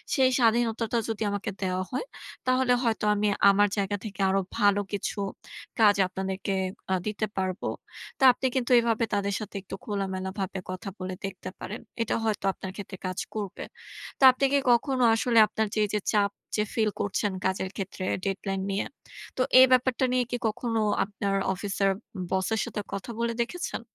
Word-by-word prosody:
সেই 260 Hz, -3 st, +4 dB
স্বাধীনতাটা 230 Hz, 0 st, +2 dB
যদি 220 Hz, -1 st, -3 dB
আমাকে 205 Hz, -1 st, -3 dB
দেওয়া 185 Hz, 0 st, 0 dB
হয় 255 Hz, -, -2 dB, 0.4 s
তাহলে 255 Hz, 0 st, +3 dB
হয়তো 225 Hz, -3 st, 0 dB
আমি 210 Hz, 0 st, +1 dB, 0.2 s
আমার 205 Hz, +1 st, +5 dB
জায়গা 205 Hz, 0 st, 0 dB
থেকে 205 Hz, -1 st, -8 dB
আরও 195 Hz, +1 st, +2 dB, 0.2 s
ভালো 205 Hz, 0 st, +4 dB
কিছু 205 Hz, +1 st, -2 dB, 0.6 s
কাজ 210 Hz, -2 st, +6 dB
আপনাদেরকে 190 Hz, +1 st, -3 dB, 0.4 s
আ -, -, +4 dB
দিতে 215 Hz, +1 st, -1 dB
পারবো। 185 Hz, 0 st, -2 dB, 0.5 s
তা -, -, 0 dB
আপনি 260 Hz, -, -1 dB
কিন্তু 250 Hz, 0 st, +1 dB
এভাবে 230 Hz, 0 st, +1 dB
তাদের 200 Hz, -1 st, 0 dB
সাথে 210 Hz, -, -8 dB
একটু 195 Hz, -, -7 dB
খোলামেলাভাবে 190 Hz, -1 st, -3 dB
কথা 185 Hz, +1 st, -5 dB
বলে 185 Hz, 0 st, -4 dB
দেখতে 190 Hz, -1 st, -6 dB
পারেন। 215 Hz, +5 st, -6 dB, 0.2 s
এটা 230 Hz, -, 0 dB
হয়তো 215 Hz, -3 st, -1 dB
আপনার 190 Hz, -, -7 dB
ক্ষেত্রে 195 Hz, -2 st, -7 dB
কাজ 185 Hz, 0 st, -4 dB, 0.2 s
করবে। 205 Hz, -3 st, -4 dB, 0.6 s
তা -, -, 0 dB
আপনি 255 Hz, +2 st, 0 dB
কি -, -, +6 dB
কখনো 255 Hz, +1 st, +2 dB
আসলে 230 Hz, +1 st, +1 dB
আপনার 220 Hz, +1 st, -1 dB
যে 215 Hz, -, 0 dB
এই -, -, -6 dB
যে 210 Hz, -, +2 dB
চাপ 205 Hz, -1 st, +3 dB, 0.3 s
যে 210 Hz, -, +2 dB
feel 220 Hz, -2 st, +2 dB
করছেন 200 Hz, 0 st, 0 dB
কাজের 190 Hz, 0 st, 0 dB
ক্ষেত্রে 195 Hz, -1 st, -5 dB, 0.2 s
deadline 195 Hz, 0 st, -2 dB
নিয়ে, 195 Hz, -, -1 dB, 0.5 s
তো -, -, +1 dB, 0.2 s
এই 260 Hz, -, +10 dB
ব্যাপারটা 255 Hz, 0 st, +3 dB
নিয়ে 255 Hz, -1 st, +3 dB
কি 245 Hz, -, 0 dB
কখনো 225 Hz, +1 st, -1 dB, 0.2 s
আপনার 200 Hz, -1 st, -2 dB, 0.2 s
অফিসের 195 Hz, 0 st, 0 dB, 0.4 s
boss 190 Hz, 0 st, 0 dB
এর -, -, -1 dB
সাথে 215 Hz, -3 st, -4 dB
কথা 200 Hz, +4 st, -5 dB
বলে 235 Hz, 0 st, 0 dB
দেখেছেন? 355 Hz, +10 st, -3 dB
205 Hz, 175 wpm, -27 LUFS, 195-230 Hz, 0.6 s, এই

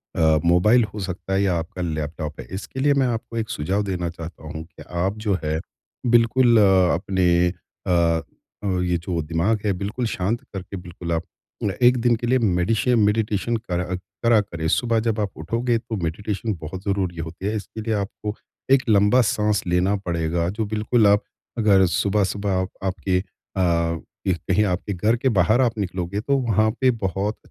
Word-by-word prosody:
अ, 80 Hz, -1 st, +4 dB
mobile 105 Hz, +8 st, +5 dB
हो 105 Hz, -, -5 dB
सकता 95 Hz, +1 st, -4 dB
है 95 Hz, -, +2 dB
या 95 Hz, -, +2 dB
आपका 85 Hz, +3 st, -6 dB
लैपटॉप 75 Hz, -2 st, -4 dB
है। -, -, -6 dB
इसके 100 Hz, +7 st, -6 dB
लिए 145 Hz, +1 st, +4 dB
मैं 135 Hz, -2 st, +2 dB
आपको 115 Hz, -1 st, -3 dB
एक 110 Hz, 0 st, -2 dB
सुझाव 95 Hz, +2 st, -1 dB
देना 90 Hz, -3 st, -2 dB
चाहता 85 Hz, -1 st, -9 dB
हूँ 80 Hz, +1 st, -6 dB
कि 85 Hz, -, -14 dB, 0.2 s
आप 100 Hz, +3 st, -1 dB
जो 100 Hz, -3 st, +2 dB
है 75 Hz, +1 st, -1 dB, 0.6 s
बिल्कुल 120 Hz, +1 st, +5 dB
अ, 95 Hz, -3 st, +5 dB
अपने 90 Hz, -1 st, +2 dB, 0.4 s
अ -, -, +1 dB, 0.7 s
अ, 100 Hz, -, -1 dB, 0.2 s
ये 90 Hz, -1 st, +1 dB
जो 85 Hz, 0 st, -3 dB
दिमाग 85 Hz, +8 st, 0 dB
है 105 Hz, -, +3 dB
बिल्कुल 105 Hz, +6 st, -3 dB
शांत 110 Hz, +3 st, -1 dB
करके 95 Hz, 0 st, -6 dB
बिल्कुल 85 Hz, -1 st, -7 dB
आप 80 Hz, 0 st, -1 dB, 0.4 s
न 100 Hz, -2 st, 0 dB
1 125 Hz, +1 st, +6 dB
दिन 120 Hz, 0 st, +4 dB
के 120 Hz, +1 st, -4 dB
लिए 130 Hz, +2 st, +3 dB
मेडिशे 110 Hz, +4 st, +1 dB
मेडिटेशन 105 Hz, 0 st, +1 dB
कर 90 Hz, -6 st, -3 dB, 0.4 s
करा 115 Hz, -2 st, +5 dB
करें। 85 Hz, -5 st, -4 dB
सुबह 115 Hz, +5 st, +2 dB
जब 110 Hz, -1 st, 0 dB
आप 100 Hz, -2 st, -1 dB
उठोगे 115 Hz, +9 st, 0 dB
तो 115 Hz, 0 st, -5 dB
मेडिटेशन 105 Hz, +6 st, -2 dB
बहुत 90 Hz, +4 st, -6 dB
ज़रूरी 95 Hz, -4 st, -1 dB
होती 80 Hz, +3 st, -6 dB
है 110 Hz, -, -1 dB
इसके 110 Hz, +1 st, -6 dB
लिए 110 Hz, 0 st, -1 dB
आपको 105 Hz, +1 st, -4 dB, 0.4 s
एक 135 Hz, -1 st, +5 dB
लंबा 105 Hz, +4 st, +5 dB
साँस 105 Hz, -2 st, +1 dB
लेना 90 Hz, +3 st, +2 dB
पड़ेगा, 85 Hz, 0 st, 0 dB
जो 110 Hz, +3 st, -2 dB
बिल्कुल 110 Hz, +1 st, +2 dB
आप 100 Hz, 0 st, +4 dB, 0.3 s
अगर 100 Hz, -4 st, +5 dB
सुबह-सुबह 100 Hz, +2 st, 0 dB
आप 95 Hz, -, -3 dB
आपके 95 Hz, -1 st, 0 dB, 0.4 s
अ, 85 Hz, -2 st, +1 dB, 0.3 s
एक 90 Hz, -2 st, +2 dB
कहीं 95 Hz, +3 st, +4 dB
आपके 95 Hz, +1 st, -2 dB
घर 105 Hz, +6 st, +2 dB
के 130 Hz, +2 st, +1 dB
बाहर 110 Hz, +4 st, +3 dB
आप 115 Hz, -3 st, +1 dB
निकलोगे 95 Hz, -1 st, -2 dB
तो 140 Hz, +4 st, +1 dB
वहाँ 110 Hz, -4 st, +2 dB
पे 130 Hz, -1 st, +5 dB
बहुत 100 Hz, -1 st, -2 dB
100 Hz, 185 wpm, -23 LUFS, 90-110 Hz, 0.7 s, 1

